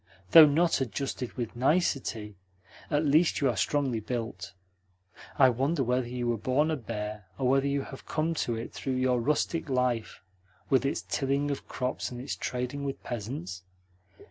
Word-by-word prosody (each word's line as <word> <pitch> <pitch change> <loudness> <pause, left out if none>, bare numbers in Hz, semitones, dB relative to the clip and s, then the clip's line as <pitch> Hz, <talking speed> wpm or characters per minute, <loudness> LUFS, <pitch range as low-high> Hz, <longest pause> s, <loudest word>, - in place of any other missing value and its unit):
Though 160 -2 +11
not 165 +1 +2
adjusted 130 +1 -3
with 120 -3 -4
nicety, 125 - 0 0.5
at 150 0 +1
least 155 +4 +3
you 140 - +2
are 120 - -1
strongly 135 +1 0
built. 110 -5 -5 0.8
I 130 -3 +7
wonder 135 +5 0
whether 125 0 0
you 120 0 -3
were 120 -2 0
born 140 +7 +1
a - - +1
bear 105 -5 -5
or 130 - 0
whether 135 +2 +3
you 140 0 0
have 135 - -11
come 160 +1 0
to 120 -6 -1
it 115 +1 -6
through 130 -1 -3
your 130 -1 +2
rustic 150 +4 0
life, 125 -6 -1 0.5
with 135 0 +4
its - - -2
tilling 140 +1 0
of 140 - -5
crops 125 0 -3
and 125 - -7
its 135 +3 -4
trading 125 +3 -3
with 140 -1 -4
peasants? 100 -6 -5
130 Hz, 170 wpm, -29 LUFS, 120-140 Hz, 0.8 s, Though